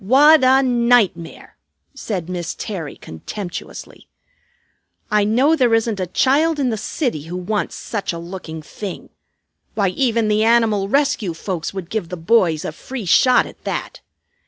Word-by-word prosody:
"What 285 +7 +6
a 265 +1 +5
nightmare!" 235 -9 +1 0.4
said 200 -11 -4
Miss 175 -2 -4
Terry 180 -10 -6
contemptuously. 175 - -8 1.0
"I 210 -1 +3
know 255 +10 +3
there 245 -6 +3
isn't 225 -2 -1
a 185 - -2
child 295 - +2
in 270 -3 0
the - - -1
city 215 - -3
who 175 +2 -6
wants 205 +4 -2
such 205 -3 -4
a 170 - -6
looking 170 -2 -8
thing. 195 +4 -8 0.7
Why, 200 -3 +2
even 230 +2 0
the 215 0 +2
Animal 220 -4 +2
Rescue 270 - +1
folks 170 -1 -4
would 185 -3 -6
give 215 -7 -3
the 180 - -5
boys 165 -3 +2
a - - -3
'free 240 +7 -7
shot' 255 +8 +4
at - - -14
that. - - -5
210 Hz, 155 wpm, -19 LUFS, 180-245 Hz, 1.0 s, What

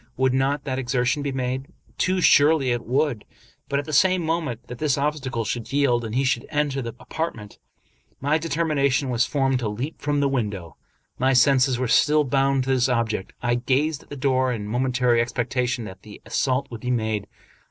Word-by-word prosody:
Would 130 0 +2
not 135 +2 0
that 130 -1 -3
exertion 125 +2 0
be 140 -1 -2
made? 130 +1 -3 0.3
Too 185 0 +1
surely 145 -4 +5
it 120 -1 -2
would; 130 -3 0 0.5
but, 140 - 0
at 145 - -2
the 155 - -6
same 185 +4 +4
moment 155 -8 -2
that 125 0 -9
this 145 -4 +1
obstacle 140 -5 -2
should 115 +1 -4
yield 135 -4 +2
and 110 0 -5
he 135 - +2
should 125 -3 0
enter 145 -2 0
the 115 -2 -6
apartment, 115 -11 -5 0.6
my 145 +3 +1
determination 150 -4 0
was 120 +1 +1
formed 135 -2 +1
to 115 -4 -2
leap 125 +9 -5
from 145 0 0
the 140 - +2
window. 105 -10 -3 0.4
My 130 +1 +3
senses 130 0 +4
were 130 0 -1
still 150 +5 +4
bound 135 0 +1
to 135 - -1
this 130 -1 +2
object. 115 -5 -1
I 120 0 +2
gazed 135 +5 0
at - - -21
the 145 - -7
door 130 -1 +1
in 110 -4 -4
momentary 125 0 +1
expectation 125 +1 -1
that 95 -2 -10
the 105 -1 -12
as - - -12
sault 135 0 0
would 115 -2 -7
be 125 - -4
made. 110 -4 -1
130 Hz, 195 wpm, -23 LUFS, 120-140 Hz, 0.6 s, surely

